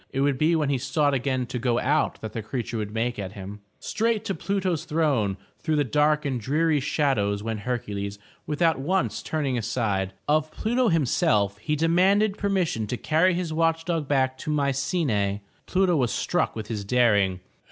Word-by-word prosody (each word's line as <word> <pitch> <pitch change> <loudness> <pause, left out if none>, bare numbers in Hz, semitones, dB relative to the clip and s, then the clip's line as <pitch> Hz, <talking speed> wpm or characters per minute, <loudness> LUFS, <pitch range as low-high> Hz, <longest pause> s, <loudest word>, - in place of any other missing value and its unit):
It 135 - -2
would 140 -2 +1
be 160 +2 +3
when 150 -3 +1
he 135 - +1
sought 145 +2 +1
again 130 -1 0
to 125 +1 -4
go 120 -1 +1
out 145 +5 +1
that 110 -1 -6
the 115 - -3
creature 120 +1 -4
would 105 -1 -4
make 115 +1 -2
at 95 -1 -5
him. 100 +1 -8 0.2
Straight 220 -1 -1
to 195 - -1
Pluto's 185 -5 -1
throne 140 - +1 0.2
through 155 - -1
the 145 - +3
dark 150 +3 +2
and 130 -4 -1
dreary 155 +5 +2
shad 140 -2 +1
ows 100 0 -1
went 110 -1 -3
Hercules 105 -4 -3 0.3
without 160 0 +1
once 185 +8 0
turning 140 -6 -1
aside. 100 -5 -1
Of 155 +1 +2
Pluto 240 +7 0
himself 105 - +2
he 150 +8 -1
demanded 190 +6 +3
permission 185 - 0
to 125 - -3
carry 165 +7 +2
his 175 -3 -2
watch 165 0 +1
dog 165 -4 -1
back 130 -2 +1
to - - -5
Mycenae. 135 - 0 0.2
Pluto 185 -2 +2
was 125 -7 +1
struck - - 0
with 110 -1 -5
his 105 -2 -4
daring. 100 -5 +2
140 Hz, 185 wpm, -25 LUFS, 110-165 Hz, 0.3 s, be